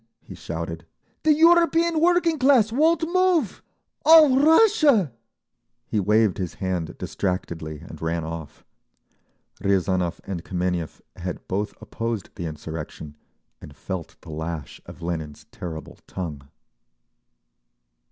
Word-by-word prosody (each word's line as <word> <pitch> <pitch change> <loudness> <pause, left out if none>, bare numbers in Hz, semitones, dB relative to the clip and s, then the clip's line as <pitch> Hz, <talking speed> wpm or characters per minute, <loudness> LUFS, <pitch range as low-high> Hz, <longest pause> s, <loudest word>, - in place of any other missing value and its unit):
he - - -11
shouted. 80 0 -6 0.3
"The 315 - +4
European 335 0 +4
working 345 -2 +3
class 255 -5 +4
won't 315 +6 +3
move! 365 - +2 0.4
All 315 -4 +8
Russia—" 305 - +5 0.7
He 110 - -1
waved 105 0 +2
his 90 -3 -4
hand 90 -4 -3
distractedly 80 -5 -4
and - - -11
ran 80 0 -1
off. 80 -2 -8 1.0
Riazanov 95 -3 +1
and 90 -4 -5
Kameniev 90 -3 -3 0.2
had 90 0 -6
both 100 +3 -3
opposed 115 -4 -4
the 85 - -5
insurrection, 75 -1 -7 0.5
and 70 - -12
felt 95 -1 -6
the - - -11
lash 80 -2 -6
of 85 - -11
Lenin's 80 -4 -5
terrible 80 -3 -8
tongue…. 75 -7 -6
95 Hz, 115 wpm, -24 LUFS, -, 1.0 s, All